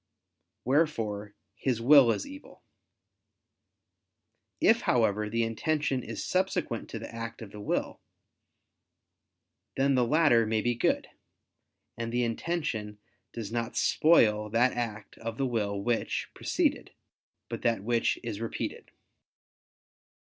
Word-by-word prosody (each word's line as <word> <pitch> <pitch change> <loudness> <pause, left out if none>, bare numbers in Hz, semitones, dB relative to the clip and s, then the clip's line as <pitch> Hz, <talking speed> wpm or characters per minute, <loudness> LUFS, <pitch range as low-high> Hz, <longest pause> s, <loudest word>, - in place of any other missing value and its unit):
Wherefore 115 -8 0 0.2
his 125 +2 -1
will 135 +1 +7
is - - -2
evil. 285 +1 -12 2.0
If, 230 +1 +4
however, 105 -3 +1
the 115 +2 0
intention 140 +4 -1
is - - -6
subsequent 180 -10 -1
to - - -5
the 115 +1 -8
act 115 0 -6
of 110 -4 -9
the 105 - -9
will, 105 - -2 1.8
then 135 +1 +3
the 125 -2 +3
latter 120 -4 +4
may 110 0 +1
be 120 +2 +1
good: 120 - 0 0.9
and 115 0 -3
the 120 +1 +1
intention 115 -4 -2 0.3
does 110 -3 -6
not 115 -1 -3
spoil 105 -10 +4
that 120 +4 +3
act 110 -3 -5
of 115 0 -5
the 135 - 0
will 105 -5 -1
which 115 +3 -1
preceded, - - -1 0.5
but - - -5
that 115 -4 +1
which 115 +1 +1
is 115 -2 -5
repeated. 115 - -4
115 Hz, 120 wpm, -29 LUFS, 110-135 Hz, 2.0 s, will